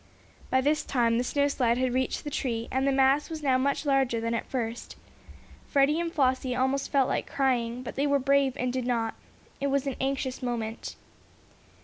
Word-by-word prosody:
By 260 - +3
this 300 +3 +1
time 235 -3 +1
the - - +1
snowslide 265 -3 +1
had 255 -1 0
reached 260 0 -1
the 295 - -5
tree, 235 -5 -2
and 265 +1 +1
the - - +3
mass 270 +2 +3
was 315 -2 -6
now 260 -2 +3
much 280 +3 0
larger 270 -4 +2
than 230 +1 -2
at 230 - -2
first. 235 -2 -4 0.7
Freddie 285 +3 +3
and 340 -1 -2
Flossie 260 -3 +1
felt 270 +1 +1
like - - -2
crying, 250 -3 0
but - - -6
they 280 +2 0
were 285 0 +3
brave 275 0 +2
and 250 -1 -1
did 255 -1 -2
not. 230 -2 0 0.5
It 280 - 0
was 280 0 0
an 275 - -2
anxious 265 -1 -2
moment. 230 -3 -4
260 Hz, 190 wpm, -28 LUFS, 245-280 Hz, 0.7 s, By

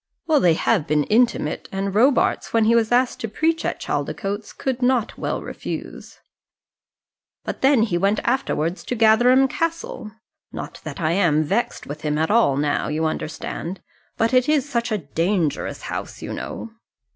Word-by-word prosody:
"Well, 315 -3 +3
they 170 -7 +4
have 175 -3 +1
been 150 -1 +2
intimate; 225 - +1
and 195 0 -2
Robarts, 250 +6 +2
when 225 -1 +4
he 225 - +4
was 230 -1 +2
asked 250 +1 +2
to 225 - -3
preach 320 +9 0
at - - -2
Chaldicotes, 205 +1 -3
could 260 -1 -3
not 245 -3 +1
well - - -3
refuse." - - -7 1.3
"But - - -5
then 265 -4 +5
he 175 -6 0
went 200 +3 +2
afterwards 195 - -1
to 250 - -2
Gatherum 240 +4 +5
Castle. 330 -8 -3 0.4
Not - - -7
that - - -6
I 160 -1 +1
am 170 -4 +3
vexed 235 +10 -1
with 150 +2 -7
him 150 -1 -1
at 160 +3 +1
all 215 -12 +4
now, 145 0 0
you 155 +2 -1
understand. 165 +3 -4 0.4
But 225 +2 +1
it 255 +2 +3
is 295 -3 +2
such 235 -4 -1
a 215 - +1
dangerous 165 +1 -1
house, - - -6
you - - -5
know." 230 - -6
220 Hz, 170 wpm, -22 LUFS, 165-250 Hz, 1.3 s, then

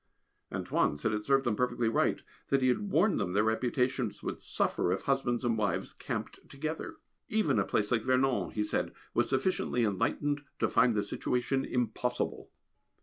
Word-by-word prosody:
"Antoine" 70 - 0
said 110 +9 -1
it 105 0 -2
served 135 +1 +3
them 120 -4 +1
perfectly 120 0 0
right, 115 - +1 0.2
that 135 -1 +2
he 130 - +4
had 200 +11 0
warned 195 +6 +3
them 90 - -1
their 105 +2 +3
reputations 125 +1 0
would - - -4
suffer - - 0
if - - -1
husbands 120 +1 0
and 115 -2 +1
wives 105 -2 -1
camped - - -5
together. 155 - -4 0.3
Even 170 - +2
a - - +3
place 105 +1 0
like 120 -2 +3
Vernon, 130 +1 +2
he 105 - -1
said, 105 - -1 0.2
was - - +2
sufficiently 135 -3 +1
enlightened 145 +8 0 0.2
to - - +2
find 120 -1 +3
the 105 - +1
situation 125 +5 -1
impossible. 125 0 -2
125 Hz, 170 wpm, -31 LUFS, 110-135 Hz, 0.3 s, he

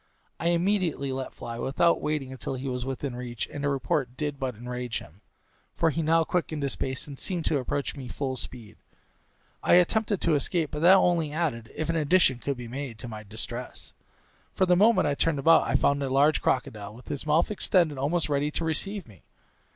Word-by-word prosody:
I 170 - -1
immediately 170 -5 +1
let 130 0 -4
fly, 115 0 -7
without 170 +7 +2
waiting 140 -4 -2
till 130 - -3
he 130 +1 -5
was 125 -1 -3
within 135 -1 -4
reach; 120 -1 -4
and 145 - -6
the 140 - +2
report 130 -1 -1
did 145 -2 -3
but 130 -3 -2
enrage 125 +1 -4
him, 90 +7 -12 0.5
for 165 - +2
he 165 - -1
now 165 +1 +3
quickened 160 -3 -2
his 140 - -1
pace 130 0 -2
and 140 -3 -9
seemed 175 -4 -2
to 145 - +2
approach 140 +3 -2
me 135 -3 -7
full 135 -1 -3
speed. 115 -4 -8 0.8
I - - +5
attempted 205 +3 +3
to 170 - +2
escape, 155 +2 0
but 150 - -4
that 180 +3 +8
only 170 -5 +2
added 150 -8 -2
(if 155 - -2
an 165 0 0
addition 150 -4 +3
could 140 +1 -3
be 120 -1 -7
made) 130 -1 -6
to 120 - -7
my 110 -2 -7
distress; 110 +4 -6 0.6
for 190 - +3
the 180 -1 +4
moment 220 +5 +5
I 145 - +2
turned 155 +1 +1
about 165 +4 +5
I - - 0
found 140 0 +2
a 135 - -1
large 140 +3 +3
crocodile, 105 -5 -1
with 125 - -14
his 145 +1 -4
mouth 155 +6 +3
extended 170 -8 +2
almost 150 +2 0
ready 145 0 0
to 165 +2 -3
receive 195 +5 -1
me. 105 -4 -17
140 Hz, 205 wpm, -27 LUFS, 125-165 Hz, 0.8 s, that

